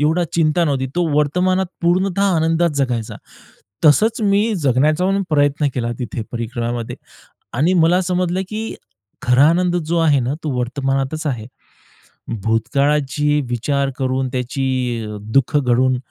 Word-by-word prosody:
एवढा 160 +4 +2
चिंता 165 +1 +2
नव्हती. 135 -4 0
तो 175 - +2
वर्तमानात 180 +5 +1 0.2
पूर्णतः 185 +3 +1
आनंदात 165 +1 +2
जगायचा. 120 -5 -2 0.7
तसंच 220 +10 +4
मी 205 +2 +2
जगण्याचा 150 +7 +2
पण 195 +1 +1
प्रयत्न 145 0 +2
केला 120 -2 -2
तिथे, 115 -2 -4
परिक्रमामध्ये 120 0 -4 0.6
आणि 165 +6 +3
मला 180 +2 +3
समजलं, 180 0 -1
की 220 +1 -4 0.5
खरा 125 +4 +5
आनंद 175 +1 +1
जो 170 0 -1
आहे 150 -5 +3
ना 125 +4 -1
तो 150 - -1
वर्तमानातच 135 +4 -2
आहे. 120 -6 -3 1.0
भूतकाळाची 140 +6 +1
विचार 140 +3 0
करून, 130 0 -1
त्याची 130 +2 -2 0.4
अ, 105 0 -6 0.2
दुःख 135 +2 +3
घडून 130 -1 +2
145 Hz, 130 wpm, -19 LUFS, 130-175 Hz, 1.0 s, खरा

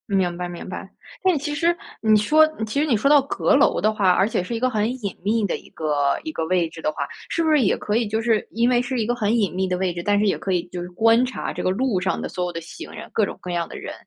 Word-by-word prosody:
明 180 -2 +1
白 180 - -3
明 175 - -8
白。 - - -7 0.3
但 370 -4 +3
其 295 +1 -3
实 335 +3 +2 0.3
你 215 -1 +5
说 310 +9 +5 0.2
其 220 +6 -2
实 300 - +2
你 275 -7 +2
说 245 - +1
到 290 -1 +7
阁 280 +1 +1
楼 285 - +3
的 215 0 +2
话， 200 -4 +2
而 190 +2 +3
且 200 -5 -1
是 230 +5 -4
一 - - -2
个 255 +2 +2
很 215 -2 0
隐 200 - -3
秘 215 +2 +1
的 195 - -1
一 - - -16
个 145 -3 0
一 315 - -4
个 160 - -3
位 180 -1 +2
置 165 0 -11
的 155 - 0
话， 140 -2 -4 0.2
是 335 - 0
不 320 - +1
是 300 -2 +4
也 205 - +2
可 210 - -2
以 230 -1 +1
就 220 +2 -1
是 225 -2 +1
因 235 +2 +1
为 245 -1 +3
是 250 0 -3
一 215 - 0
个 240 - 0
很 220 -1 +1
隐 205 -4 +1
秘 190 +1 0
的 180 -1 -1
位 185 -1 -1
置， 175 - -4
但 205 +1 +2
是 210 - +2
也 200 - +1
可 195 - -3
以 175 -2 +1
就 175 - -5
是 175 - -6
观 225 +6 +4
察 255 - -4
这 - - -4
个 - - +2
路 210 0 0
上 190 +1 -1
的 - - -3
所 180 - -3
有 175 - -3
的 165 - -5
行 165 - -10
人， - - -9
各 215 - +3
种 - - -7
各 180 - -6
样 170 -1 -1
的 - - -8
人， - - -7
210 Hz, 335 characters per minute, -22 LUFS, 180-245 Hz, 0.3 s, 到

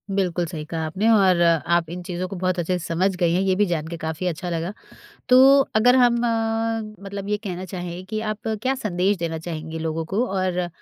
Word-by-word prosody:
बिल्कुल 180 -3 0
सही 160 -2 -6
कहा 160 0 -3
आपने 190 +8 -1
और, 190 -5 +4
आप 170 0 +2
इन 180 +1 -6
चीज़ों 180 +1 -4
को 195 - -7
बहुत 185 0 -1
अच्छे 180 +2 0
से 165 - -7
समझ 185 +3 0
गई 170 -1 +1
हैं, 180 - +2
ये 190 -1 +2
भी 205 +2 +3
जान 160 -4 -2
के 170 - -6
काफ़ी 160 +2 -3
अच्छा 175 +1 -3
लगा। 170 +3 -3 0.6
तो 265 +2 +8 0.2
अगर 245 +4 +5
हम 245 -2 +5 0.9
मतलब 200 0 -6
ये 210 - +1
कहना 185 -2 -5
चाहें 180 -1 -6
कि 215 +3 -3
आप 215 +1 -7
क्या 265 +1 +1
संदेश 200 -4 0
देना 165 -2 -3
चाहेंगे 160 -1 -6
लोगों 160 0 -2
को 205 +9 0
और 185 -2 0
180 Hz, 210 wpm, -23 LUFS, 170-200 Hz, 0.9 s, तो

